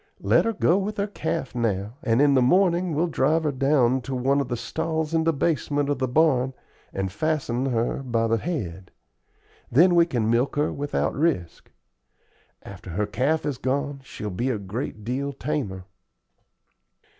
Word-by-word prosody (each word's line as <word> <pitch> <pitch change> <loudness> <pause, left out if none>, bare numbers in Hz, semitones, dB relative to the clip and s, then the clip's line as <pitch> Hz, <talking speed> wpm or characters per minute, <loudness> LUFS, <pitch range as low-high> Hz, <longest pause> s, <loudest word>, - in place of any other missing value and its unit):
Let - - +4
her 230 - 0
go 190 -2 +2
with 210 +2 -3
her 200 - +1
calf 165 -8 -3
now, 110 -2 -1
and 120 -2 +2
in 145 -1 +4
the 130 - +4
morning 175 +3 +3
we'll 160 +4 +2
drive 160 0 +1
her 150 - +1
down 130 -2 +2
to 130 +2 -5
one 135 +3 +2
of 135 - -3
the 120 - -2
stalls 160 +3 -2
in 160 0 +2
the 165 - +4
basement 145 -1 0
of 145 - -1
the 130 - 0
barn 130 -2 +2 0.4
and 95 -1 -3
fasten 135 0 -1
her 120 +1 -1
by 115 -3 0
the 115 0 +1
head. 95 - -4 0.8
Then 175 +8 +5
we 170 -1 +5
can 120 -8 -1
milk 120 +4 +1
her 145 +1 0
without 145 +1 -1
risk. 140 - -1 0.9
After 100 0 -10
her 100 +5 -1
calf 145 +9 0
is 145 -4 -2
gone 140 +1 -2
she'll 105 -5 -6
be 120 +8 -1
a 120 - 0
great 105 +2 -5
deal 135 +5 -2
tamer." 125 -11 -3
135 Hz, 175 wpm, -24 LUFS, 115-160 Hz, 0.9 s, Then